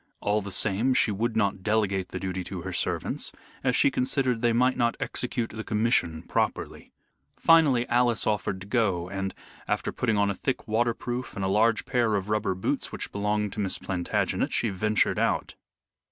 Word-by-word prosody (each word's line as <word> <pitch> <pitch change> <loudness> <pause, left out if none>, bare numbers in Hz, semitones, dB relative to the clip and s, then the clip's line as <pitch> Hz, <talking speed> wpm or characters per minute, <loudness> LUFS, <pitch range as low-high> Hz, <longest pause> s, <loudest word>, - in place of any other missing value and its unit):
All 105 +1 +1
the 100 0 -6
same, 110 +7 +2
she 110 - +3
would 110 +3 -1
not 100 -3 +1
delegate 100 -3 0
the - - -5
duty 95 -1 -3
to 90 -1 -6
her 95 0 -5
servants, - - -1 0.3
as 125 -2 +2
she 140 - +4
considered 125 -2 0
they 120 -1 +3
might 125 +3 +3
not 120 -1 +1
execute 120 -2 -2
the 110 0 -6
commission 105 -8 +1
properly. - - -2 0.5
Finally 145 -7 +4
Alice 120 -1 +2
offered 100 -3 -1
to - - -8
go, 100 -6 0
and, 95 0 -3 0.3
after - - -1
putting 115 -4 0
on 100 0 +2
a - - -1
thick 125 +7 -3
waterproof 120 +2 -1
and 95 - -2
a - - +1
large 110 +3 +2
pair 120 -4 +1
of 100 +1 -2
rubber 105 -3 0
boots 95 - -2
which - - -5
belonged 105 0 -1
to - - -6
Miss 95 -3 0
Plantagenet, 90 -2 -1
she 115 - 0
ventured 105 +2 +1
out. - - 0
105 Hz, 180 wpm, -27 LUFS, 95-120 Hz, 0.5 s, she